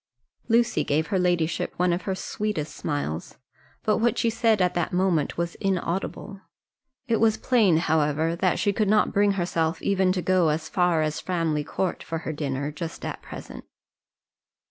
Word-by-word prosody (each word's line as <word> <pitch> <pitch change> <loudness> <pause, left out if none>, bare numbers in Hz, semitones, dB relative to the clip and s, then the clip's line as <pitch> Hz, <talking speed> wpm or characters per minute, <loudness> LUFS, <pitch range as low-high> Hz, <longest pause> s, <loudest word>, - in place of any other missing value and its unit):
Lucy 235 0 +2
gave 155 +2 +1
her 190 - +3
ladyship 175 -2 0
one 180 0 +2
of 175 - -2
her 190 - 0
sweetest 210 -6 -3
smiles, 145 - -4 0.5
but 215 - +2
what 230 0 +2
she 230 - +2
said 225 -2 +2
at 180 -1 +2
that 175 -2 -1
moment 180 -5 +1
was 170 0 -2
inaudible. 195 +1 -2 0.7
It 230 -2 +2
was 220 -1 +3
plain, 215 -10 +3
however, 160 0 +1
that 185 0 +1
she 205 -1 +1
could 210 0 +1
not 210 0 +3
bring 200 0 +3
herself 170 -3 -1
even 190 -2 +2
to 180 -2 -2
go 185 -3 +3
as 155 +1 -1
far 175 -3 +2
as 155 0 -2
Framley 165 -5 -1
Court 185 +4 -2
for 165 - -4
her 160 - -2
dinner 145 -1 -3
just 165 +2 -6
at - - -5
present. - - -9
180 Hz, 170 wpm, -25 LUFS, 160-200 Hz, 0.7 s, her